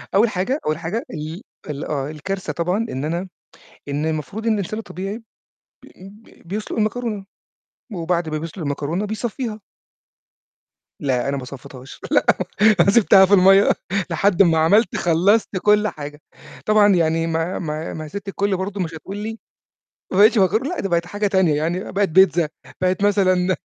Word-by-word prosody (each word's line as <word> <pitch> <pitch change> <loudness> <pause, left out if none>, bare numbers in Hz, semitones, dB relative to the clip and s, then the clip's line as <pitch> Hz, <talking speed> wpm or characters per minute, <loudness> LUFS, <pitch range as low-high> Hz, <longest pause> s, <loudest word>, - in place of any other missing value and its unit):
أول 215 +4 +5
حاجة 215 +10 -1
أول 155 0 0
حاجة 175 +8 -3
ال 155 +5 -6 0.3
ال 145 -1 -4
آه، 140 -2 -3
الكارثة 185 +6 -5
طبعًا 180 +6 -1
إن 130 +3 -4
أنا 170 +4 -3 0.6
إن 145 +2 -2
المفروض 160 - -3
إن 225 - +3
الإنسان 210 +1 -3
الطبيعي 205 +2 -6 0.6
بي - - -16 0.5
ب - - -18
بيسلُق 210 +4 -4
المكرونة، 215 -1 -2 0.7
وبعد 170 -2 -1
ما 155 - -2
بيسلُق 165 +4 -7
المكرونة، 150 +6 -2
بيصفّيها 220 +1 -4 1.4
لأ، 130 -2 0
أنا 140 - -1
ما 130 - -6
صفّيتهاش 130 0 -11
لأ، - - +3 0.5
أنا 185 +3 +5
سِبتها 195 -3 +6
في 195 - +1
المَيّة 195 +1 +6 0.4
لحد 190 +3 +3
ما 165 -3 +3
عملت 185 +6 +3
خلّصت 180 +6 +2
كلّ 210 0 +4
حاجة 150 -4 -7 0.4
طبعًا، 210 -2 +5
يعني 165 -1 +1
ما 165 +2 -2
ما 155 -1 -4
ما 155 - -6
هي - - -10
سِت 200 +5 -7
الكلّ 195 0 -1
برضه 195 +1 -4
مش 165 -2 -3
هتقول 190 +5 -8
لي 220 +2 -5 0.7
ما 185 - -1
بقيتش 215 +4 +6
مكرونة، 215 +8 +2
لأ، 360 - -4
ده 195 - -2
بقت 170 -1 +1
حاجة 205 +3 -2
تانية 190 -6 +2
يعني، 170 +5 -2
بقت 200 0 +1
بيتزا 175 -2 +4 0.3
بقت 185 +2 +1
مثلًا 185 -2 +2
185 Hz, 165 wpm, -21 LUFS, 160-205 Hz, 1.4 s, سِبتها